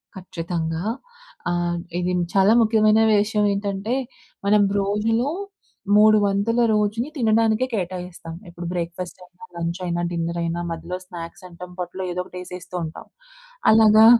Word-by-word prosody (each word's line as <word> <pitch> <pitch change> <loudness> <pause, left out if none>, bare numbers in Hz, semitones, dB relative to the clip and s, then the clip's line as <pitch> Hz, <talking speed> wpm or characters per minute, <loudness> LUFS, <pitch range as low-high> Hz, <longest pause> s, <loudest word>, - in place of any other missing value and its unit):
ఖచ్చితంగా. 170 -2 -3 0.7
ఆహ్, 175 0 0 0.2
ఇది 180 0 0 0.2
చాలా 195 +3 +5
ముఖ్యమైన 220 -1 +4
విషయం 210 0 +2
ఏంటంటే, 200 +2 -2 0.5
మనం 205 +1 +5 0.2
రోజులో 220 +6 +1 0.7
3 215 +1 +7
వంతుల 200 +4 +1
రోజుని 215 +5 +1
తినడానికే 225 0 +3
కేటాయిస్తాం. 180 -4 -4 0.2
ఇప్పుడు 175 0 -8
బ్రేక్‌ఫాస్ట్ 175 +1 -4
అయినా, 180 +5 -15
లంచ్ 170 +1 -3
అయినా, 175 0 -1
డిన్నర్ 170 0 -2
అయినా 170 +1 -2
మధ్యలో 165 +2 -4
స్నాక్స్ 175 +2 -9
అంటాం. 180 +1 -10
పొట్టలో 180 +1 -4
ఏదోకటి 180 +1 -5
యేసేస్తూ 180 0 -9
ఉంటాం. 160 0 -7 0.7
అలాగా 220 0 +7
185 Hz, 125 wpm, -23 LUFS, 175-215 Hz, 0.7 s, 3